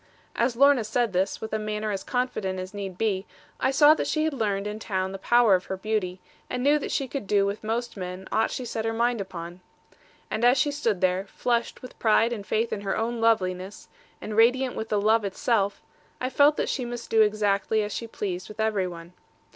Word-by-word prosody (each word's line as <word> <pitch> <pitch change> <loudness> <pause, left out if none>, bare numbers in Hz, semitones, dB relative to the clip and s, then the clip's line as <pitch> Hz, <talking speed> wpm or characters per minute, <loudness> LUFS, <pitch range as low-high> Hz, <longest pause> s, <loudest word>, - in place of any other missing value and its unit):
As 235 0 +1
Lorna 275 -1 +5
said 220 0 0
this, 190 +2 0
with 220 - -6
a 215 - 0
manner 215 0 -3
as 195 - -3
confident 245 -7 -2
as 185 +1 -7
need 195 -3 -6
be, 200 -3 -1 0.3
I 260 - +2
saw 295 +3 +7
that - - -2
she 310 - 0
had 315 -1 0
learned 205 -5 -1
in 210 +1 -4
town 190 -3 -2
the 195 - -7
power 240 -1 +4
of 180 0 +2
her 190 - -4
beauty, 190 -3 -2 0.3
and 250 0 -2
knew 295 +2 +4
that - - -5
she 270 - -1
could 260 -5 -5
do 200 -1 +3
with 200 +2 -3
most 230 +2 -2
men 185 0 -6
aught 225 - +2
she 255 - -4
set 225 -1 -3
her 225 0 -1
mind 235 -1 +1
upon. 175 -2 -7 0.7
And 220 - -2
as 245 +2 +5
she 290 +2 +2
stood 230 -10 -1
there, 185 +1 +1
flushed 235 +3 -2
with 255 - -11
pride 225 +1 +3
and 205 -4 -7
faith 225 +1 0
in 200 - -3
her 195 -1 -2
own 230 +1 -2
loveliness, 190 -4 0 0.3
and 215 - -6
radiant 250 +3 +3
with 220 - -4
the 210 - +1
love 220 +2 +3
itself, 200 0 0 0.4
I 255 +1 -2
felt 290 +3 +5
that - - 0
she 260 - -2
must 240 -1 -6
do 225 - +5
exactly 210 0 +2
as 205 - -4
she 230 - -4
pleased 185 -5 -4
with 215 +1 -12
every 215 -4 +1
one. 170 0 -10
215 Hz, 225 wpm, -26 LUFS, 195-240 Hz, 0.7 s, saw